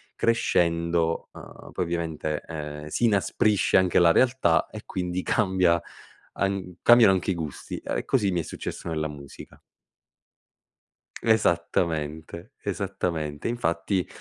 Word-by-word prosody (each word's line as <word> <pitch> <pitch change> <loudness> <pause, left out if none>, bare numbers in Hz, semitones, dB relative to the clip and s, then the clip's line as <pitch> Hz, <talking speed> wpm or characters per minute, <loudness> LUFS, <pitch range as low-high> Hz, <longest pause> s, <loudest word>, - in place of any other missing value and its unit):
crescendo, 85 -6 +1
uhm, - - -12
poi 90 - -1
ovviamente, 80 -3 -3
ehm, 75 -1 -6
si 120 +10 0
inasprisce 105 -1 +2
anche 95 -2 +3
la 85 -1 +6
realtà, 120 -6 +3
e - - -9
quindi 90 0 -3
cambia 95 -4 +2 0.6
an 95 -2 -2
cambiano 120 -4 +7
anche 95 +1 0
i - - -1
gusti, 80 -4 -6
uhm, - - -2
e - - -4
così 105 -7 +1
mi 90 - 0
è - - -2
successo - - -7
nella 80 -1 -1
musica. 70 -2 -12 1.6
Esattamente, 85 -4 0
esattamente. 75 -4 -3
Infatti, 90 -4 -1
85 Hz, 120 wpm, -26 LUFS, 80-95 Hz, 1.6 s, cambiano